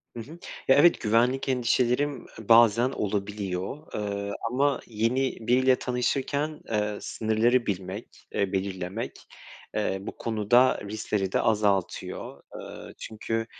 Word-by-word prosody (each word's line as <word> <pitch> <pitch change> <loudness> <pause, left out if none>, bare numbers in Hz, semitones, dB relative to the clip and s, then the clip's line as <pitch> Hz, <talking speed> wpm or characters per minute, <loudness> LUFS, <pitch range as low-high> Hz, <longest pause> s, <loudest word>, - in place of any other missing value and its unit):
Hı - - -5
hı. 125 +7 -8 0.4
Ya, 135 - +7
evet, 170 +4 +5
güvenlik 120 +5 +2
endişelerim, 125 +2 +1
e, 110 0 -12
bazen 115 +1 +6
olabiliyor, 100 -1 -3 0.2
eee, 100 -1 -3 0.2
ama 140 +3 +2
yeni 120 +4 0
biriyle 130 +1 +5
tanışırken, 140 +5 -1
eee, 105 -1 0
sınırları 115 +3 +1
bilmek, 95 +2 -5
eee, 100 -2 0
belirlemek, 95 +2 -4 0.5
eee, 105 -2 0
bu - - -7
konuda 115 +3 +3
riskleri 100 -2 -2
de - - +2
azaltıyor. 105 -4 -1 0.2
Eee, - - -9
çünkü 115 +1 -3
115 Hz, 120 wpm, -27 LUFS, 100-125 Hz, 0.5 s, Ya